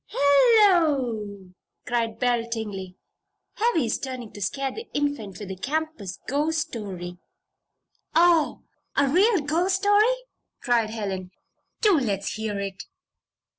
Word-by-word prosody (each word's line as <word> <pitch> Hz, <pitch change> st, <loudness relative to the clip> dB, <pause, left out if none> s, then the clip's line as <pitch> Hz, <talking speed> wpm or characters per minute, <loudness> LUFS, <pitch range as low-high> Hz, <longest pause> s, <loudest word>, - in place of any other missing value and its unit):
"Hello!" 280 Hz, -, +3 dB, 0.3 s
cried 230 Hz, -2 st, -1 dB
Belle 240 Hz, -1 st, 0 dB
Tingley. 200 Hz, -5 st, -5 dB, 0.6 s
"Heavy's 335 Hz, -, +1 dB
trying 255 Hz, -4 st, -6 dB
to 205 Hz, -, -9 dB
scare 270 Hz, +8 st, -1 dB
the 450 Hz, +2 st, -8 dB
Infant 285 Hz, -10 st, -2 dB
with 205 Hz, -1 st, -8 dB
the 190 Hz, -, -4 dB
campus 270 Hz, -, -3 dB
ghost 300 Hz, +2 st, 0 dB
story." 180 Hz, -5 st, -6 dB, 1.0 s
"Oh! 335 Hz, -2 st, +4 dB, 0.3 s
a 280 Hz, 0 st, +4 dB
real 375 Hz, -, +4 dB
ghost 335 Hz, +6 st, +1 dB
story!" 410 Hz, +5 st, +4 dB, 0.4 s
cried 235 Hz, -4 st, +1 dB
Helen. 195 Hz, -4 st, -4 dB, 0.5 s
"Do 405 Hz, -8 st, +5 dB
let's 200 Hz, -6 st, -2 dB
hear 215 Hz, -2 st, -3 dB
it." 195 Hz, 0 st, -5 dB
250 Hz, 115 wpm, -25 LUFS, 205-320 Hz, 1.0 s, Do